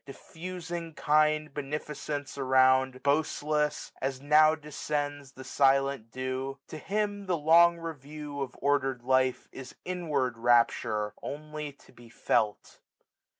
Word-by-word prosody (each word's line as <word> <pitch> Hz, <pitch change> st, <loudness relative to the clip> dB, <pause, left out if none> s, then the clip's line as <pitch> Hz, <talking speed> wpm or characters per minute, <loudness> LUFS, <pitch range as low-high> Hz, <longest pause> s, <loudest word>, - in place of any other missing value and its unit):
Diffusing 170 Hz, +2 st, -7 dB
kind 155 Hz, 0 st, +2 dB
beneficence 145 Hz, 0 st, -5 dB
around, 130 Hz, -1 st, +3 dB
Boastless, 150 Hz, +1 st, 0 dB
as 135 Hz, 0 st, -2 dB
now 155 Hz, +2 st, +5 dB
descends 145 Hz, -2 st, -4 dB
the 130 Hz, -, -10 dB
silent 135 Hz, -4 st, +2 dB
dew 130 Hz, +2 st, -4 dB
} -, -, -63 dB
To 155 Hz, -, -7 dB
him 205 Hz, 0 st, -2 dB
the 180 Hz, -2 st, +1 dB
long 170 Hz, +3 st, +5 dB
review 150 Hz, -2 st, -7 dB
of 130 Hz, -2 st, -4 dB
order'd 135 Hz, -3 st, 0 dB
life 130 Hz, 0 st, +1 dB
Is 130 Hz, -1 st, -10 dB
inward 150 Hz, -10 st, -2 dB
rapture, 115 Hz, -3 st, +2 dB
only 150 Hz, 0 st, -6 dB
to 140 Hz, -, -21 dB
be 120 Hz, -2 st, -16 dB
felt. 110 Hz, -2 st, -1 dB
145 Hz, 120 wpm, -29 LUFS, 130-155 Hz, -, now